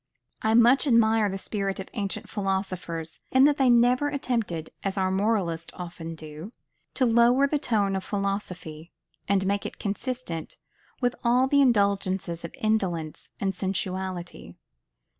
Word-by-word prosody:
I 220 +1 +2
much 240 +5 +5
admire 225 -3 +4
the 195 - -3
spirit 195 0 -3
of 190 - -4
the - - -21
ancient 200 -4 -3
philosophers, 185 -5 -3
in 260 +1 +5
that 290 0 +5
they 265 -2 +4
never 245 +4 +4
attempted, 230 - -2
as 195 0 -2
our 185 -1 +1
moralists 190 -5 0
often 170 -2 -7
do, 155 +5 -9 0.4
to 260 - +3
lower 240 +3 +5
the 290 +1 0
tone 210 -8 +1
of 190 - -2
philosophy, 180 -6 -4 0.4
and 195 -1 +2
make 200 +1 0
it - - -6
consistent 210 -5 -4 0.4
with 245 -1 +1
all 245 +2 +4
the 280 +1 +4
indulgences 195 -7 +1
of 170 - -6
indolence 185 -8 -1
and 195 -1 0
sensuality. 185 -2 -4
200 Hz, 145 wpm, -26 LUFS, 185-235 Hz, 0.4 s, much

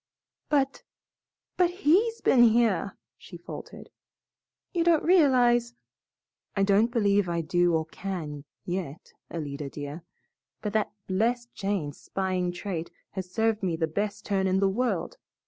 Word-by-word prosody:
"But 275 -2 +1 0.8
but 360 -2 +4
HE'S 395 +6 +2
been 250 - +5
here," 225 -5 +3 0.2
she - - -11
faltered; - - -10 0.8
"you 340 -2 +2
don't 335 -2 +4
realize 245 -8 +4 0.4
" - - -52
"I 195 - +3
don't 200 +4 +4
believe 205 -5 +2
I 170 -1 0
do 175 +1 +2
or 160 0 0
can, 160 -5 -5 0.2
yet, 175 -5 -5 0.2
Alida, 145 -3 -5
dear, 145 +3 -7 0.6
but 210 -2 -4
that 215 -1 +1
blessed 235 +5 0
Jane's 195 -8 -3
spying 185 -2 -1
trait 175 -2 -4 0.2
has 185 -2 -5
served 220 +2 +1
me 180 -4 0
the 160 0 0
best 200 +6 -3
turn 195 -2 +1
in 190 0 +2
the 195 - +3
world. 250 - -1
200 Hz, 140 wpm, -27 LUFS, 175-240 Hz, 0.8 s, been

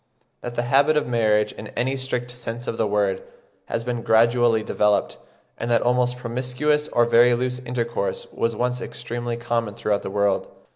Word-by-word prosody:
that 120 0 -6
the 120 - 0
habit 140 +5 +3
of 150 - +1
marriage, 110 -3 +2
in 105 - -9
any 130 +3 0
strict 125 -2 -3
sense 120 -1 -6
of - - -2
the 110 - +2
word, 100 -2 0 0.4
has 115 0 -3
been 120 -1 -3
gradually 115 0 +3
developed; 105 -1 +1 0.4
and 115 - -3
that 120 - +3
almost 125 0 +1
promiscuous 125 +5 -1
or 120 - +3
very 120 +1 +5
loose 125 +1 -2
intercourse 120 -4 -3
was 115 0 -1
once 125 +1 -1
extremely 120 0 -4
common 115 -3 -2
throughout 105 -1 0
the - - -5
world. 100 0 +1
120 Hz, 175 wpm, -23 LUFS, 115-125 Hz, 0.4 s, very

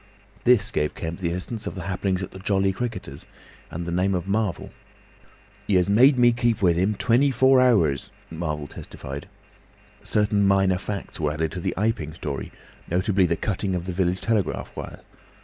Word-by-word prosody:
This 120 -5 +4
gave 75 - -1
Kemp 85 0 -5
the 85 -3 -1
essence 105 +6 -4
of - - -5
the 95 - -5
happenings 95 0 -1
at - - -7
the 95 - -10
"Jolly 95 0 +1
Cricketers," 95 - -5 0.4
and 85 +1 -5
the 85 - -4
name 95 +2 +1
of 90 +1 -3
Marvel. 100 -2 -1 1.0
"He 100 - +2
has 90 +2 +3
made 130 +6 +6
me 120 -1 +6
keep 120 -1 +1
with 90 -4 +3
him 95 +5 +1
twenty 125 +6 +3
four 130 +1 +5
hours," 95 - +3 0.2
Marvel 75 -3 -3
testified. 70 0 -8 0.7
Certain 105 -1 +1
minor 95 -2 +3
facts 100 -1 -6
were 75 -2 0
added 80 +1 -2
to 90 - -5
the - - -2
Iping 95 -7 -1
story, 70 -4 -5 0.4
notably 95 +1 +2
the 85 -1 0
cutting 95 0 -1
of 90 -1 -3
the 90 - -4
village 90 0 0
telegraph 110 -5 -1
wire. - - -7
95 Hz, 180 wpm, -24 LUFS, 85-105 Hz, 1.0 s, made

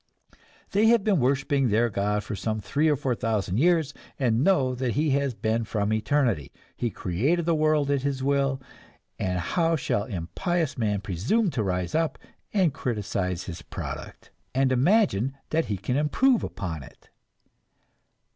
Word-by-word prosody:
They 210 +2 +4
have 230 -2 +5
been 200 -5 +2
worshipping 135 +1 +2
their 110 +3 +3
God 105 +1 0
for 105 - -5
some 110 +3 -2
three 140 +10 +1
or 150 - +3
four 135 -2 -1
thousand 110 -4 -1
years, 160 -2 +3 0.2
and 120 -2 +2
know 140 -9 +3
that 125 -2 -1
He 150 +1 +1
has 140 -2 0
been 110 +2 0
from 105 -1 -1
eternity; 110 - 0 0.2
He 120 - -1
created 130 - 0
the 170 - +2
world 155 -2 +2
at 140 -2 +1
His 135 -1 -2
will, 135 -1 +1 0.6
and 90 -1 -1
how 165 - +1
shall 105 -8 -1
impious 140 - -2
man 105 -4 0
presume 120 - 0
to 120 - -1
rise 90 -3 -2
up 160 0 0 0.3
and 185 -8 +2
criticize 100 -8 -2
His 85 -2 -7
product, - - -7 0.2
and 135 0 +3
imagine 135 - +2
that 160 +1 +1
he 100 - -2
can 125 +7 -2
improve 235 - +3
upon 80 -5 -4
it? 65 - -16
130 Hz, 160 wpm, -26 LUFS, 105-155 Hz, 0.6 s, have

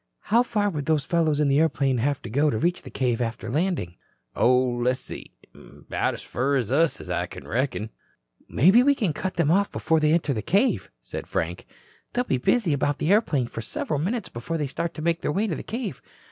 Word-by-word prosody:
"How 235 - +7
far 210 -4 0
would 150 -3 -4
those 155 -4 +2
fellows 160 -4 +1
in 150 - +3
the 140 +1 +3
airplane 140 -5 +2
have 140 +3 -1
to 120 - -6
go 145 +5 +3
to 110 - -1
reach 175 +9 0
the - - -10
cave 125 -3 -1
after 115 -1 -3
landing?" 155 - -1 0.4
"Oh, 125 +1 +4
le's 125 0 +1
see. - - -8 0.2
'Bout - - -4
as - - -9
fur 135 +3 0
as 120 -3 -2
us, 155 - +1
I 90 0 -1 0.2
reckon." 115 -2 -2 0.6
"Maybe 190 - +5
we 280 +2 +4
can 200 - 0
cut 185 +5 -4
them 170 -3 +2
off 200 +3 +2
before 160 0 +1
they 155 0 +3
enter 160 -4 +1
the 110 - -2
cave," 205 - +1
said - - -7
Frank. 85 +2 -3 0.5
"They'll 245 - +1
be 130 - -1
busy 180 - +2
about 145 +1 0
the 160 - 0
airplane 165 - +3
for 115 - -6
several 140 +6 -3
minutes 195 +5 -2
before 125 +8 -4
they 150 - -1
start 165 +5 -4
to 155 - -6
make 170 0 +1
their - - -1
way 200 +8 0
to 200 - -1
the - - -5
cave. 225 - -5
150 Hz, 215 wpm, -25 LUFS, 125-180 Hz, 0.6 s, How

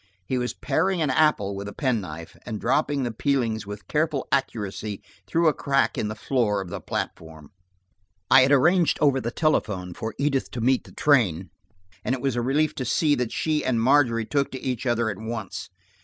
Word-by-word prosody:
He 125 +7 -1
was 125 0 -3
paring 190 -1 0
an 145 - +1
apple 130 -9 +2
with 100 +1 -6
a 100 - -7
penknife, 95 - -3
and 110 -3 -5
dropping 140 +2 +1
the 120 - -2
peelings 115 -3 -1
with 105 0 -8
careful 150 -3 0
accuracy 105 -6 -2 0.2
through 165 0 +2
a 155 - +4
crack 140 -1 +1
in 105 - -1
the 105 - -4
floor 105 -2 0
of 95 -2 -6
the - - -6
platform. 80 -3 -6 0.8
I 135 - +9
had 130 +2 +3
arranged 165 +5 +4
over 140 -3 +3
the 120 - -2
telephone 100 - 0
that 110 +5 -5
Edith 140 -1 0
should 120 - -4
meet 130 +1 +2
the - - -14
train, 95 - +2 0.5
and 130 - 0
it 125 - -8
was 135 -3 0
a 120 - 0
relief 150 +5 +1
to 130 - -2
see 145 +5 +2
that 125 -4 -1
she 155 -1 0
and 120 -3 +1
Margery 120 -2 +3
took 140 +3 0
to 130 - -4
each 130 -1 -2
other 120 -1 +1
at 100 - -8
once. 110 -4 -5
125 Hz, 200 wpm, -25 LUFS, 105-140 Hz, 0.8 s, I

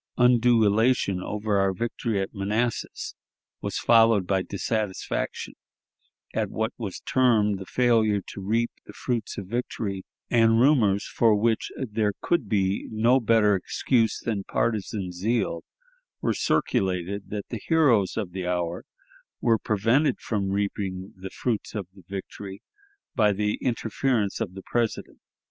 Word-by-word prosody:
Undue 120 -2 +5
elation 105 -2 +2
over 105 0 -1
our 95 0 +2
victory 115 +1 -2
at 95 - -3
Manassas 105 +4 -2 0.5
was - - -3
followed 115 -4 +5
by 95 0 +1
dissatisfaction 100 +1 -3 0.8
at - - -1
what 110 +1 -2
was 105 -6 -6
termed 110 -6 +2
the 95 - -8
failure 115 -4 +3
to 100 - -7
reap 115 +4 0 0.2
the - - -10
fruits 120 -4 -3
of 100 - -5
victory; 105 -3 -3 0.3
and 115 -1 +5
rumors, 115 -7 +4
for 115 -2 +3
which 110 +2 +1
there 110 -4 -1
could 150 - 0
be 95 -2 0
no 115 +4 +3
better 110 -3 +4
excuse 110 +4 +1
than 105 -4 -2
partisan 105 -4 -1
zeal, 95 -1 -1 0.6
were - - 0
circulated 95 +1 0
that 105 -1 -5
the 115 -4 -5
heroes 130 - +3
of 100 -5 -2
the 90 -1 -4
hour 90 0 -2 0.5
were 115 -2 +3
prevented 115 +10 +2
from 100 -4 -2
reaping 100 -1 -2
the 95 0 -8
fruits 110 -1 -3
of 100 -3 -3
the 95 - -16
victory 95 0 -7 0.5
by 105 -1 +3
the 105 +1 -1
interference 115 -3 0
of 90 - -3
the 95 - -8
President. 120 -2 -2
105 Hz, 140 wpm, -26 LUFS, 95-115 Hz, 0.8 s, Undue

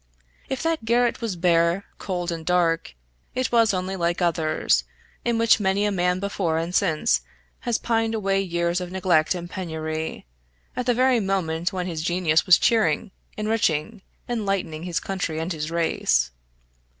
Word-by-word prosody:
If 265 - -3
that 325 -5 0
garret 235 +1 +2
was 225 -5 -2
bare, 170 +2 +2
cold, 180 -3 -3
and 165 -1 -5
dark, 165 - +1 0.4
it 255 -2 -1
was 230 -2 +4
only 185 0 -2
like 170 -1 0
others, 165 -3 +1 0.4
in 235 -1 +1
which 230 -1 +4
many 200 +1 +1
a 205 - +1
man 180 -1 +1
before 190 -4 -1
and 165 +2 -2
since 165 -6 +2 0.4
has 240 -3 0
pined 225 -1 0
away 195 -2 +1
years 170 -1 -1
of 180 0 -6
neglect 180 -3 +2
and 175 -1 -5
penury, 160 - -4 0.5
at 250 -1 -3
the 245 - +3
very 255 0 +3
moment 180 -4 -1
when 185 -2 -3
his 165 -3 -3
genius 175 0 +1
was 180 - +8
cheering, 210 -6 +2 0.3
enriching, 215 -3 0 0.3
enlightening 195 -8 -2
his 175 -2 -1
country 180 -5 -3
and 165 +3 -2
his 155 -1 -4
race. 165 - +1
180 Hz, 160 wpm, -24 LUFS, 165-215 Hz, 0.5 s, was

